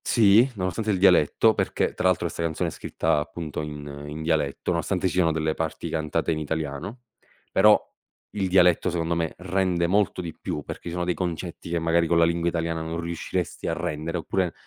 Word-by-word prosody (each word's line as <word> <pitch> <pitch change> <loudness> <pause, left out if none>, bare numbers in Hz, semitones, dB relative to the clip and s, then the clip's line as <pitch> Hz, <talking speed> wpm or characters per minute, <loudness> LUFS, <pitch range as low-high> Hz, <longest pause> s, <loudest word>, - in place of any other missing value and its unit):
Sì, 115 +2 +5
nonostante 100 +3 -2
il 100 - +1
dialetto, 90 +3 +5
perché - - -1
tra 95 - +2
altro 85 -1 +1
'sta 85 - -6
canzone 85 -1 -1
è - - -8
scritta - - -1
appunto 75 +1 -5
in 75 -1 -7
in 75 +2 -6
dialetto, 80 -3 0
nonostante 90 +2 0
ci - - -3
siano 90 -3 +3
delle 80 0 0
parti 80 -1 -4
cantate 80 +1 -1
in 80 - -1
italiano, 80 - -4 0.5
però 105 +2 +6 0.5
il 100 -2 -1
dialetto, 90 -1 +4
secondo 85 -1 -1
me, 85 -1 -2
rende 90 -1 0
molto 100 0 +1
di 85 -3 -6
più, 75 - -4
perché - - -8
ci 85 - -4
sono 90 +1 -2
dei 90 - +1
concetti 85 0 -5
che, 85 0 0
magari, 85 +1 +2
co' 85 - +2
la 85 0 +5
lingua 85 0 +1
italiana 85 -1 -2
non 80 +1 -4
riusciresti 85 +1 -3
a - - 0
rendere 85 0 -3
oppure 90 +1 -1
85 Hz, 195 wpm, -25 LUFS, 80-90 Hz, 0.5 s, però